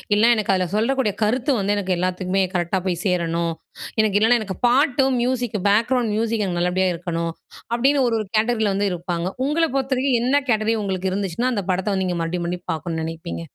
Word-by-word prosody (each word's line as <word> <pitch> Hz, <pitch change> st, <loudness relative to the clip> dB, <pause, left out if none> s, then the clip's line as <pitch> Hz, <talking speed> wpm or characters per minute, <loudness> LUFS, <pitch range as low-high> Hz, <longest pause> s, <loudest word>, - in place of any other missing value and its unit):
இல்லனா 220 Hz, 0 st, +4 dB
அதுல 185 Hz, -1 st, 0 dB
சொல்லக்கூடிய 230 Hz, 0 st, +1 dB
கருத்து 250 Hz, +6 st, +1 dB
வந்து 200 Hz, +1 st, +1 dB
எனக்கு 190 Hz, -2 st, 0 dB
எல்லாத்துக்குமே 185 Hz, +1 st, 0 dB
கரெக்டா 175 Hz, +2 st, 0 dB
போய் 175 Hz, -1 st, -1 dB
சேரணும். 170 Hz, -2 st, 0 dB, 0.5 s
எனக்கு 210 Hz, -2 st, +3 dB
இல்லனா 235 Hz, +3 st, +4 dB
எனக்கு 190 Hz, -4 st, -5 dB
பாட்டும், 265 Hz, 0 st, +3 dB
மியூசிக் 245 Hz, -4 st, -1 dB
பேக்ரவுண்ட் 230 Hz, +1 st, +2 dB
மியூசிக் 225 Hz, -1 st, 0 dB
எனக்கு 175 Hz, -2 st, -2 dB
நல்லபடியா 185 Hz, +1 st, +1 dB
இருக்கணும்." 170 Hz, -1 st, -3 dB, 0.4 s
அப்படின்னு 270 Hz, +3 st, +3 dB
ஒரு 230 Hz, -, +1 dB
ஒரு 215 Hz, -, -4 dB
கேட்டகிரில 220 Hz, -2 st, +2 dB
வந்து 200 Hz, +1 st, +1 dB
இருப்பாங்க. 175 Hz, 0 st, -3 dB, 0.2 s
உங்கள 305 Hz, +4 st, +1 dB
பொறுத்தவரைக்கும், 265 Hz, -2 st, +1 dB
என்ன 260 Hz, +3 st, +2 dB
கேட்டகிரி 220 Hz, 0 st, +2 dB
உங்களுக்கு 190 Hz, -1 st, -2 dB
இருந்துச்சுன்னா, 200 Hz, +6 st, -1 dB
அந்த 200 Hz, -4 st, -2 dB
படத்த 190 Hz, +3 st, -1 dB
வந்து 190 Hz, -1 st, 0 dB
நீங்க 175 Hz, -1 st, -1 dB
மறுபடியும் 165 Hz, 0 st, -2 dB, 0.2 s
மறுபடியும் 180 Hz, 0 st, -5 dB
பாக்கணும்னு 160 Hz, 0 st, -4 dB
நெனைப்பீங்க? 165 Hz, +1 st, -5 dB
205 Hz, 175 wpm, -22 LUFS, 180-240 Hz, 0.5 s, இல்லனா